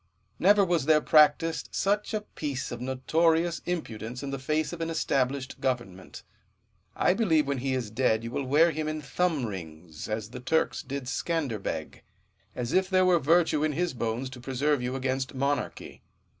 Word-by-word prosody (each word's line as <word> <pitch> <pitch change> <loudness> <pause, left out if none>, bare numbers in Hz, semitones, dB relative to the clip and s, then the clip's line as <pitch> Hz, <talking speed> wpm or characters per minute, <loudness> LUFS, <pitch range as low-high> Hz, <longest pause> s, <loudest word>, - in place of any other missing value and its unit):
Never 200 +2 +5
was 170 -6 +1
there 155 -1 +6
practised 155 +2 +3
such 205 +2 0
a 215 - -1
piece 145 -9 -5
of 120 - -6
notorious 160 +6 +1
impudence 125 -8 -4
in 140 - -4
the 135 - -3
face 155 +4 -1
of 170 - -6
an 165 - -1
established 135 -4 -1
government. 120 -8 -3 0.7
I - - +3
believe 165 -9 +2
when 140 -1 -1
he 130 +1 -1
is 120 -5 -3
dead 110 -2 +1
you 115 - -5
will 140 - -2
wear 155 +6 +4
him 155 -1 -3
in 155 0 -3
thumb 160 -1 0
rings, 80 -5 -8
as 110 0 -3
the 125 - -7
Turks 160 +6 0
did 140 0 -5
Scanderbeg; 130 - -3 0.5
as 125 -1 -3
if 185 0 +2
there 185 -1 +4
were 180 -2 +4
virtue 160 0 +3
in 155 -1 +1
his 175 +2 -1
bones 120 +2 -3
to 125 -2 -10
preserve 135 +2 0
you 125 +1 -2
against 130 0 -2
monarchy. 140 +2 -2
140 Hz, 175 wpm, -28 LUFS, 125-165 Hz, 0.7 s, there